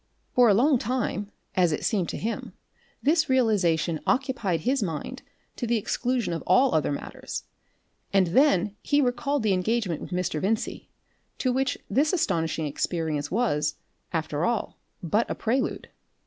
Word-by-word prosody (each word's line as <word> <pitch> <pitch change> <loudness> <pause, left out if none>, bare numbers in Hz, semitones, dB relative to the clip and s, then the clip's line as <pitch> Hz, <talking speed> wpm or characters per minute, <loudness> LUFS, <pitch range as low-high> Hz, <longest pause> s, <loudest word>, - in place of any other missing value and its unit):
For 245 -2 +6
a 200 - +5
long 260 +4 +4
time, 215 -4 -2 0.2
as 180 -3 +3
it 150 - -2
seemed 195 -7 +1
to - - -4
him, 230 +2 -4 0.5
this 315 +1 +3
realisation 185 -10 +2
occupied 245 - 0
his 260 +2 +1
mind 190 - -4 0.4
to 240 - -2
the 235 0 +2
exclusion 240 -1 -1
of 165 - -3
all 265 +1 +5
other 155 -2 +2
matters, 140 - -5 0.7
and 195 -1 +4
then 205 - +3
he 290 - +2
recalled 265 +1 0
the 210 -3 +3
engagement 185 -2 0
with - - -7
Mr. 180 -4 -1
Vincey, 215 +3 -2 0.5
to 255 -2 0
which 265 0 0
this 295 +5 +2
astonishing 165 - 0
experience 150 0 -2
was, 155 -9 0 0.4
after 155 -2 -2
all, 235 +1 -1 0.2
but 205 +7 +1
a - - -2
prelude. 255 +4 -1
215 Hz, 150 wpm, -26 LUFS, 170-255 Hz, 0.7 s, For